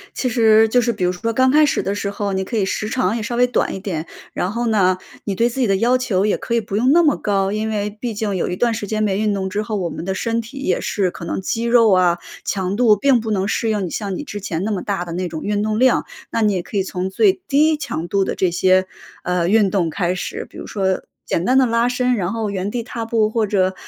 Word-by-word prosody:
其 255 Hz, -, -1 dB
实 225 Hz, -2 st, +5 dB
就 245 Hz, +2 st, +3 dB
是 235 Hz, 0 st, +1 dB
比 205 Hz, -5 st, -4 dB
如 180 Hz, -, +2 dB
说 185 Hz, +6 st, -3 dB
刚 260 Hz, +3 st, +3 dB
开 305 Hz, +2 st, +5 dB
始 295 Hz, -, +1 dB
的 195 Hz, -, -1 dB
时 205 Hz, 0 st, -3 dB
候， 200 Hz, 0 st, -3 dB
你 190 Hz, 0 st, -1 dB
可 225 Hz, +4 st, -4 dB
以 200 Hz, -, +2 dB
时 215 Hz, +2 st, -2 dB
长 250 Hz, -2 st, 0 dB
也 235 Hz, -, -2 dB
稍 230 Hz, +3 st, -3 dB
微 245 Hz, +1 st, +4 dB
短 245 Hz, -, 0 dB
一 -, -, -5 dB
点。 175 Hz, -5 st, -4 dB, 0.3 s
然 180 Hz, -, -2 dB
后 235 Hz, +2 st, -2 dB
呢， 190 Hz, -4 st, +3 dB, 0.3 s
你 200 Hz, -, -2 dB
对 230 Hz, +5 st, +2 dB
自 245 Hz, +2 st, -5 dB
己 250 Hz, -, +2 dB
的 195 Hz, -, +2 dB
要 240 Hz, +6 st, +3 dB
求 205 Hz, -6 st, 0 dB
也 210 Hz, -, +2 dB
可 235 Hz, -, -3 dB
以 230 Hz, -, +2 dB
不 200 Hz, -2 st, -5 dB
用 245 Hz, +5 st, +3 dB
那 340 Hz, +3 st, +5 dB
么 300 Hz, -3 st, +3 dB
高。 195 Hz, -1 st, 0 dB
因 215 Hz, +1 st, -2 dB
为 210 Hz, -1 st, -2 dB
毕 235 Hz, -3 st, -3 dB
竟 205 Hz, -1 st, -2 dB
有 180 Hz, -, -1 dB
一 180 Hz, -, -2 dB
段 235 Hz, +4 st, +1 dB
时 210 Hz, -2 st, -4 dB
间 215 Hz, +1 st, -1 dB
没 200 Hz, -2 st, 0 dB
运 210 Hz, -1 st, +1 dB
动 190 Hz, -1 st, -2 dB
之 205 Hz, -, -1 dB
后， 215 Hz, 0 st, -4 dB
我 180 Hz, -3 st, -1 dB
们 -, -, -6 dB
的 190 Hz, +2 st, -2 dB
身 230 Hz, +3 st, -1 dB
体 235 Hz, +5 st, -11 dB
也 185 Hz, -9 st, 0 dB
是 190 Hz, -4 st, 0 dB
可 -, -, -10 dB
能 -, -, -3 dB
肌 225 Hz, +4 st, -2 dB
肉 235 Hz, -2 st, +5 dB
啊、 180 Hz, -2 st, +4 dB, 0.3 s
强 190 Hz, -1 st, -2 dB
度 225 Hz, -2 st, +5 dB
并 255 Hz, +2 st, +3 dB
不 220 Hz, -, -5 dB
能 195 Hz, -2 st, 0 dB
适 225 Hz, +2 st, 0 dB
应 210 Hz, -3 st, 0 dB
你 -, -, -5 dB
像 200 Hz, -3 st, -3 dB
你 -, -, -5 dB
之 205 Hz, -8 st, -7 dB
前 175 Hz, -3 st, -3 dB
那 220 Hz, -, -1 dB
么 200 Hz, -, -2 dB
大 195 Hz, -4 st, -2 dB
的 170 Hz, -, -7 dB
那 180 Hz, +2 st, -2 dB
种 160 Hz, -1 st, -6 dB
运 205 Hz, 0 st, 0 dB
动 215 Hz, 0 st, -1 dB
量， 255 Hz, +1 st, +3 dB, 0.3 s
那 230 Hz, -, 0 dB
你 210 Hz, -2 st, +3 dB
也 180 Hz, -2 st, -2 dB
可 -, -, -10 dB
以 200 Hz, -, +3 dB
从 185 Hz, -1 st, -3 dB
最 385 Hz, -, +4 dB
低 305 Hz, +2 st, +3 dB
强 170 Hz, -, -4 dB
度 195 Hz, +1 st, +1 dB
的 -, -, -2 dB
这 185 Hz, -, +1 dB
些， 185 Hz, +2 st, +3 dB, 0.4 s
呃， 180 Hz, -1 st, 0 dB
运 205 Hz, 0 st, +4 dB
动 180 Hz, -5 st, 0 dB
开 180 Hz, +2 st, -1 dB
始。 180 Hz, -, -4 dB
比 -, -, -13 dB
如 -, -, -7 dB
说 190 Hz, -2 st, -1 dB, 0.2 s
简 170 Hz, -, -1 dB
单 255 Hz, +4 st, +3 dB
的 265 Hz, -, +5 dB
拉 230 Hz, 0 st, +2 dB
伸， 250 Hz, 0 st, +1 dB
然 190 Hz, -2 st, -2 dB
后， 225 Hz, -2 st, -2 dB
原 195 Hz, 0 st, -3 dB
地 235 Hz, +2 st, -3 dB
踏 230 Hz, 0 st, -5 dB
步 225 Hz, -2 st, +1 dB
或 220 Hz, -1 st, 0 dB
者， 190 Hz, -2 st, +1 dB
210 Hz, 310 characters per minute, -20 LUFS, 190-230 Hz, 0.4 s, 实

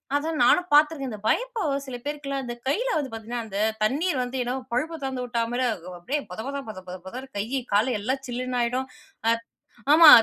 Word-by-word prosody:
அதான் 310 Hz, +2 st, 0 dB
நானும் 360 Hz, 0 st, +5 dB
பாத்துருக்கேன். 295 Hz, -2 st, +4 dB
இந்த 210 Hz, -, -5 dB
பயப்ப 430 Hz, -, +1 dB
சில 260 Hz, -2 st, -6 dB
பேருக்குலாம் 280 Hz, -2 st, -3 dB
இந்த 240 Hz, -, -4 dB
கையில 475 Hz, -, +1 dB
வந்து 285 Hz, -3 st, -1 dB
பாத்தீங்கன்னா, 230 Hz, +1 st, -4 dB
அந்த 200 Hz, -3 st, -5 dB, 0.3 s
தண்ணீர் 285 Hz, +6 st, +1 dB
வந்து 250 Hz, +1 st, -4 dB
என்னமோ 250 Hz, +2 st, -2 dB
பைப்ப 310 Hz, +7 st, 0 dB
துறந்து 265 Hz, -2 st, -2 dB
விட்டா 235 Hz, -1 st, -1 dB
மாரி 245 Hz, +1 st, 0 dB
அது 185 Hz, -5 st, -4 dB
அப்டியே 265 Hz, +13 st, -1 dB
பொதபத, 225 Hz, +10 st, -4 dB
பொத, 215 Hz, -, -7 dB
பொத, 180 Hz, -, -5 dB
பொதன்னு 255 Hz, +7 st, -7 dB
கை, 200 Hz, -, +1 dB, 0.3 s
கால் 215 Hz, +5 st, +4 dB
எல்லாம் 260 Hz, +6 st, -1 dB
சில்லுன்னு 250 Hz, +1 st, -2 dB
ஆயிடும். 255 Hz, +3 st, 0 dB, 0.4 s
அ 230 Hz, -, +6 dB, 0.6 s
ஆமா 320 Hz, 0 st, +10 dB
260 Hz, 190 wpm, -26 LUFS, 235-290 Hz, 0.6 s, ஆமா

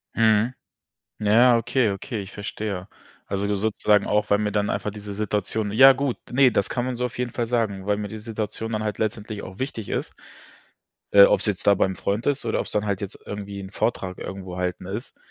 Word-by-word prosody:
Mhm. 110 Hz, +2 st, +3 dB, 0.7 s
Ja, 105 Hz, -1 st, +2 dB
ja, 120 Hz, +1 st, +7 dB
okay, 120 Hz, 0 st, +1 dB
okay, 105 Hz, +4 st, -4 dB
ich 95 Hz, -, -10 dB
verstehe. 100 Hz, -2 st, -5 dB, 0.4 s
Also, 100 Hz, +1 st, -1 dB
sozusagen 105 Hz, 0 st, +2 dB
auch, 105 Hz, 0 st, +1 dB
weil 100 Hz, -, +5 dB
mir 105 Hz, -1 st, -1 dB
dann 105 Hz, 0 st, 0 dB
einfach 105 Hz, -, -2 dB
diese 105 Hz, 0 st, -8 dB
Situation 105 Hz, 0 st, -2 dB
ja 135 Hz, +4 st, +9 dB
gut, 135 Hz, -1 st, -1 dB
ne, 130 Hz, +1 st, +5 dB
das 100 Hz, -, +1 dB
kann 120 Hz, -1 st, -1 dB
man 130 Hz, -, -2 dB
so 125 Hz, -, -2 dB
auf 125 Hz, -, -9 dB
jeden 125 Hz, -2 st, -2 dB
Fall 120 Hz, -, -1 dB
sagen, 105 Hz, -5 st, -1 dB
weil 105 Hz, -, +2 dB
mir 105 Hz, 0 st, -3 dB
die 110 Hz, +1 st, -7 dB
Situation 110 Hz, 0 st, -4 dB
dann 110 Hz, 0 st, -1 dB
halt 105 Hz, -2 st, -3 dB
letztendlich 105 Hz, -1 st, -3 dB
auch 95 Hz, +1 st, -10 dB
wichtig 125 Hz, -6 st, -4 dB
ist. -, -, -3 dB, 1.0 s
Äh, 100 Hz, 0 st, +9 dB
ob's -, -, +4 dB
jetzt 105 Hz, -4 st, -2 dB
da 100 Hz, -, +8 dB
beim 95 Hz, 0 st, +1 dB
Freund 100 Hz, +5 st, -2 dB
ist 140 Hz, -3 st, 0 dB
oder 115 Hz, -, 0 dB
ob's -, -, -4 dB
dann 105 Hz, 0 st, 0 dB
halt 100 Hz, -1 st, -1 dB
jetzt 100 Hz, -1 st, -6 dB
irgendwie 100 Hz, -1 st, -6 dB
'n 95 Hz, -, -9 dB
Vortrag 95 Hz, -6 st, -2 dB
irgendwo 95 Hz, -1 st, -6 dB
halten 90 Hz, 0 st, -3 dB
ist, 105 Hz, +6 st, -6 dB
105 Hz, 215 wpm, -24 LUFS, 100-115 Hz, 1.0 s, ja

